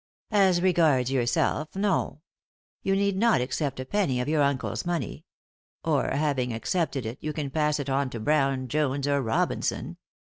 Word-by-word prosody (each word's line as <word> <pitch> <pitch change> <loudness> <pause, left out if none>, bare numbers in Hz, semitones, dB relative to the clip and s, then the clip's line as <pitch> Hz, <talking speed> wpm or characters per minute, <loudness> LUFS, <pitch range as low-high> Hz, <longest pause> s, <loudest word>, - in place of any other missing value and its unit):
" - - -40
As 190 -4 +4
regards 155 -8 +3
yourself, 135 +5 0
no. 195 -6 0 0.6
You 195 - +1
need 200 0 +1
not 225 - +3
accept 130 +2 -2
a 130 - -4
penny 145 -7 0
of 125 - -2
your 155 0 +2
uncle's 140 -1 0
money 175 -1 -2
j 155 - -23 0.7
or, 140 -3 +2
having 140 -4 0
accepted 135 +3 -1
it, 115 +5 -5
you 155 0 -3
can 145 -2 -4
pass 150 -1 +1
it 140 - -4
on 135 0 0
to 120 - -6
Brown, 135 0 +1
Jones, 140 0 0
or 140 -1 +2
Robinson. 115 -3 -1
145 Hz, 175 wpm, -27 LUFS, 130-165 Hz, 0.7 s, As